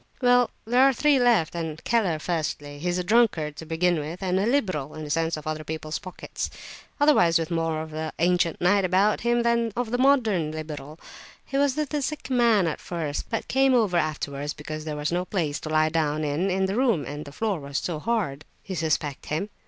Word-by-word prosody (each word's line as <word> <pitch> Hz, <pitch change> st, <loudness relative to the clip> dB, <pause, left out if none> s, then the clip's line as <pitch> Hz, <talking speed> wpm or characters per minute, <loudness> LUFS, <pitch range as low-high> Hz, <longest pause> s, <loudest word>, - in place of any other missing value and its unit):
"Well, 245 Hz, -1 st, +4 dB, 0.2 s
there 245 Hz, +3 st, +3 dB
are 270 Hz, 0 st, +6 dB
three 285 Hz, +2 st, +3 dB
left, 230 Hz, -10 st, +3 dB
then—Keller 170 Hz, +3 st, -1 dB
firstly. 150 Hz, -3 st, -3 dB
He 175 Hz, +4 st, -2 dB
is 175 Hz, -, 0 dB
a 180 Hz, -, -1 dB
drunkard 180 Hz, -8 st, +2 dB
to 160 Hz, -, -8 dB
begin 165 Hz, +1 st, +1 dB
with, 160 Hz, +6 st, -6 dB
and 185 Hz, 0 st, +1 dB
a 200 Hz, -, +1 dB
liberal 185 Hz, -, 0 dB
(in 155 Hz, -, -6 dB
the 150 Hz, -, -5 dB
sense 165 Hz, 0 st, 0 dB
of 155 Hz, -, -9 dB
other 155 Hz, 0 st, -3 dB
people's 155 Hz, 0 st, -4 dB
pockets), 185 Hz, -2 st, -6 dB, 0.5 s
otherwise 230 Hz, -, +5 dB
with 165 Hz, 0 st, -3 dB
more 165 Hz, -1 st, -1 dB
of 160 Hz, -, -10 dB
the 155 Hz, 0 st, -4 dB
ancient 175 Hz, -1 st, +2 dB
knight 195 Hz, +3 st, +3 dB
about 190 Hz, +3 st, +2 dB
him 240 Hz, 0 st, +2 dB
than 235 Hz, -1 st, +1 dB
of 245 Hz, -2 st, -2 dB
the 245 Hz, -, 0 dB
modern 225 Hz, -, +3 dB
liberal. 155 Hz, -1 st, -7 dB, 0.5 s
He 275 Hz, -, -7 dB
was 280 Hz, -1 st, +2 dB
with 305 Hz, -2 st, -1 dB
the 295 Hz, -1 st, -1 dB
sick 290 Hz, -1 st, -4 dB
man 235 Hz, -6 st, +4 dB
at 160 Hz, -, -3 dB
first, 160 Hz, -5 st, -4 dB
but 225 Hz, -, -3 dB
came 270 Hz, 0 st, +3 dB
over 215 Hz, -7 st, +2 dB
afterwards 145 Hz, -3 st, -2 dB
because 155 Hz, +1 st, -6 dB
there 150 Hz, -1 st, -4 dB
was 150 Hz, +2 st, -2 dB
no 175 Hz, +1 st, 0 dB
place 165 Hz, -6 st, -2 dB
to 155 Hz, -, -7 dB
lie 155 Hz, 0 st, +3 dB
down 155 Hz, -1 st, 0 dB
in 185 Hz, +6 st, 0 dB
the 190 Hz, +1 st, -2 dB
room 230 Hz, -, +2 dB
and 145 Hz, +1 st, -6 dB
the 140 Hz, -, -10 dB
floor 205 Hz, +2 st, -1 dB
was 140 Hz, -1 st, -5 dB
so 165 Hz, -4 st, -2 dB
hard." 180 Hz, -9 st, -1 dB, 0.2 s
"You 190 Hz, -, -5 dB
suspect 155 Hz, -4 st, -1 dB
him?" 180 Hz, +8 st, -2 dB
175 Hz, 215 wpm, -25 LUFS, 155-225 Hz, 0.5 s, are